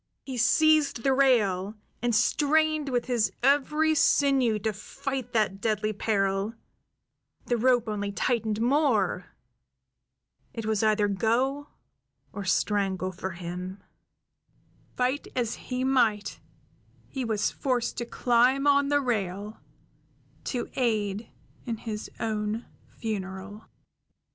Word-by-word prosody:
He 265 - -5
seized 295 +1 +3
the 270 - +3
rail, 215 -7 +2 0.3
and 240 -1 +1
strained 305 +5 +2
with 245 -2 0
his 240 -4 +1
every 300 +3 +3
sinew 275 -6 +3
to 215 +1 -2
fight 265 +4 -5
that 210 -3 +1
deadly 215 0 0
peril; 200 0 0 0.9
the 240 - +1
rope 245 0 +2
only 205 -1 -2
tightened 220 +1 -1
more; 235 - +1 1.3
it 225 -2 -4
was 220 -2 0
either 215 -1 +3
go 250 +8 0 0.7
or 200 0 -5
strangle 190 -1 0
for 185 +1 -5
him; 180 +2 -7 1.1
fight 255 +3 0
as 240 -2 0
he 255 0 -4
might, 240 -6 +1 0.7
he 265 - -4
was 220 -3 0
forced 250 -3 -1
to 235 - -3
climb 250 +3 +2
on 280 -1 +4
the 290 0 +3
rail, 210 -4 -3 0.8
to 245 -3 -2
aid 215 -4 -1 0.4
in 230 -1 -2
his 215 -1 -6
own 215 0 -2 0.3
funeral. 200 -1 -5
225 Hz, 115 wpm, -27 LUFS, 205-260 Hz, 1.3 s, on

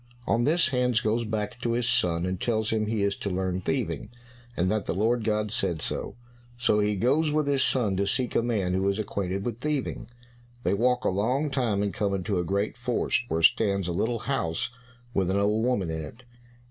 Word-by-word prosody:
On 120 0 +2
this 165 0 +3
Hans 125 -3 +2
goes 115 +2 0
back 105 +1 -3
to 115 - 0
his 120 0 0
son, 85 -7 +2
and 90 0 -3
tells 110 -2 0
him 110 -1 0
he 110 -2 0
is 100 0 +1
to 100 - -3
learn 95 0 -1
thieving, 120 -1 -2 0.5
and 90 +2 +1
that 110 -2 -1
the - - -1
Lord 115 +4 +1
God 105 -1 +1
had 105 -1 -5
said 85 -6 0
so. - - -4 0.4
So 120 -3 +2
he 105 0 +1
goes 140 +9 +2
with 150 0 +1
his 140 -1 +2
son 115 -9 +2
to 100 +1 +1
seek 125 +5 0
a - - +4
man 105 -6 0
who 95 +1 +1
is 100 - 0
acquainted 100 -2 -3
with 120 -1 -3
thieving. 140 -5 -2 0.5
They 90 - +1
walk 125 +4 +1
a - - +4
long 125 +10 0
time 115 -7 +1
and 100 - -1
come 100 -2 0
into 95 0 -1
a - - 0
great 100 +6 -1
forest, 125 0 0
where 80 -4 -1
stands 100 -1 +3
a - - -1
little 115 +7 0
house 125 -5 -1 0.4
with 95 -4 +1
an 95 - +1
old 105 +2 +2
woman 105 -9 0
in 80 0 -3
it. 115 +12 -11
105 Hz, 220 wpm, -27 LUFS, 95-120 Hz, 0.5 s, a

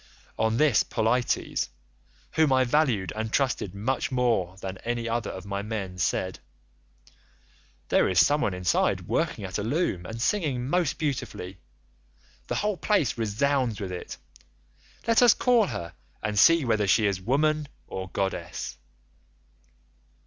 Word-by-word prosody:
On 110 0 +2
this 145 -6 +4
Polites, 120 +3 0 0.6
whom 160 -3 +3
I 130 0 +4
valued 125 -8 +1
and 110 0 -3
trusted 125 -9 0
more 115 -4 0
than 95 -1 -6
any 120 0 -3
other 115 0 -1
of 95 0 -7
my 100 0 -3
men, 100 -4 -5
said, 90 0 -1 1.5
'There - - +3
is 95 - +5
some 145 +1 +2
one 100 -10 0
inside 90 -1 +1
working 105 - -1
at 95 +2 -4
a - - -2
loom 110 - -1
and 115 +1 -6
singing 135 - 0
most 170 0 +1
beautifully; 110 - -4 0.9
the - - -2
whole 210 -2 0
place 170 - +1
resounds 115 +2 0
with 95 -3 -4
it, 90 - -6 0.9
let 230 0 +4
us 245 -2 +7
call 240 -5 +3
her 85 - -5 0.3
and 105 -1 0
see 165 +2 +6
whether 110 -3 +1
she 110 +3 +4
is 100 -2 0
woman 150 +7 +1 0.2
or 95 0 -6
goddess. 95 +3 -3
115 Hz, 140 wpm, -26 LUFS, 100-145 Hz, 1.5 s, us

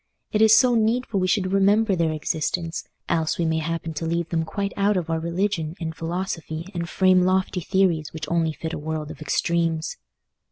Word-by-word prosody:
It 215 - +1
is 220 0 +7
so 245 +3 +5
needful 225 -1 +1
we 185 - +1
should 185 -1 +1
remember 200 +1 +3
their 165 -2 +1
existence, 160 +2 -2 0.2
else 160 -2 0
we 170 - 0
may 160 0 +1
happen 165 0 -3
to 155 +2 -4
leave 170 0 -1
them 165 -1 0
quite 200 +4 -3
out 200 0 +2
of 170 -2 -2
our 160 - 0
religion 170 -1 -1
and 160 -2 -4
philosophy 165 -1 -4
and 170 -1 -3
frame 185 -1 +4
lofty 185 +1 +1
theories 175 -4 +1
which 155 -2 -5
only 165 0 +1
fit 160 +2 -5
a - - -3
world 155 0 -4
of - - -12
extremes. 165 +2 0
170 Hz, 195 wpm, -24 LUFS, 160-195 Hz, 0.2 s, is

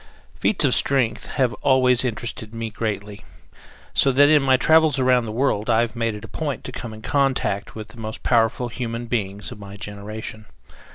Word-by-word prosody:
Feats 185 -7 +1
of 130 - +3
strength 125 -5 +1
have 130 -4 0
always 130 -2 +4
interested 115 -1 -4
me 115 -1 -4
greatly, 105 -2 -4 0.7
so 135 - +4
that 145 +2 +5
in 155 -1 +5
my 130 -1 +4
travels 160 0 +4
around 125 -2 +3
the - - -4
world 115 -2 0
I 115 0 +4
have 120 0 -2
made 115 -2 -1
it 105 - -9
a - - -10
point 150 -4 -4
to - - -6
come 120 -2 -6
in 110 0 -11
contact 135 -8 0
with 110 0 -8
the 115 - -16
most 110 0 -6
powerful 120 +1 +2
human 115 0 -4
beings 105 -4 -3
of - - -9
my 100 0 -10
generation. 105 +1 -7
115 Hz, 190 wpm, -22 LUFS, 110-130 Hz, 0.7 s, that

